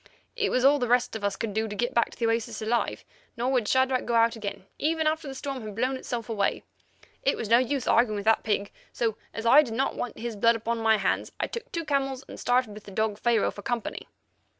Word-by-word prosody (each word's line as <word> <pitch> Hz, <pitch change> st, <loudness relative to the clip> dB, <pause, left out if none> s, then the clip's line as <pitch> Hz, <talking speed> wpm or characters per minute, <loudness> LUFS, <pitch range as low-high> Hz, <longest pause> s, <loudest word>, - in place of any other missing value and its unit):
It 440 Hz, -4 st, +1 dB
was 255 Hz, +1 st, +1 dB
all 285 Hz, +1 st, +6 dB
the 245 Hz, -, 0 dB
rest 245 Hz, 0 st, +2 dB
of 220 Hz, -, -5 dB
us 200 Hz, -1 st, 0 dB
could 220 Hz, -3 st, -4 dB
do 220 Hz, +1 st, 0 dB
to 205 Hz, -, -6 dB
get 240 Hz, +4 st, -1 dB
back 235 Hz, -2 st, +2 dB
to -, -, -14 dB
the 235 Hz, -, 0 dB
oasis 230 Hz, 0 st, -1 dB
alive, 225 Hz, +2 st, -1 dB, 0.3 s
nor 245 Hz, +3 st, 0 dB
would 245 Hz, -5 st, +1 dB
Shadrach 260 Hz, +1 st, +2 dB
go 235 Hz, -, 0 dB
out 230 Hz, 0 st, +4 dB
again 205 Hz, -4 st, -6 dB
even 320 Hz, +1 st, +1 dB
after 310 Hz, 0 st, 0 dB
the 270 Hz, -, -6 dB
storm 270 Hz, -1 st, -4 dB
had 215 Hz, -2 st, -7 dB
blown 255 Hz, +4 st, 0 dB
itself 240 Hz, -3 st, -4 dB
away. 210 Hz, -4 st, 0 dB, 0.6 s
It 275 Hz, -, +1 dB
was 215 Hz, -, -4 dB
no 235 Hz, +1 st, +7 dB
use 255 Hz, +1 st, -1 dB
arguing 230 Hz, -2 st, +3 dB
with 205 Hz, 0 st, -4 dB
the 225 Hz, 0 st, +6 dB
pig, 205 Hz, -2 st, -1 dB, 0.2 s
so, 225 Hz, -3 st, -1 dB, 0.2 s
as 225 Hz, -, -6 dB
I 265 Hz, +6 st, +8 dB
did 235 Hz, -7 st, -4 dB
not 270 Hz, +3 st, 0 dB
want 245 Hz, -, -4 dB
his 235 Hz, -1 st, -4 dB
blood 230 Hz, +3 st, +4 dB
upon 230 Hz, +1 st, -2 dB
my 220 Hz, -1 st, +4 dB
hands, 195 Hz, -, -1 dB
I -, -, +1 dB
took 470 Hz, +1 st, -7 dB
two 335 Hz, -2 st, -3 dB
camels 270 Hz, -3 st, -1 dB
and -, -, -10 dB
started 245 Hz, -3 st, +1 dB
with 210 Hz, 0 st, -11 dB
the -, -, -10 dB
dog 215 Hz, +1 st, -1 dB
Pharaoh 235 Hz, -3 st, +2 dB
for 205 Hz, -, -10 dB
company. 235 Hz, +1 st, -3 dB
235 Hz, 250 wpm, -27 LUFS, 220-260 Hz, 0.6 s, I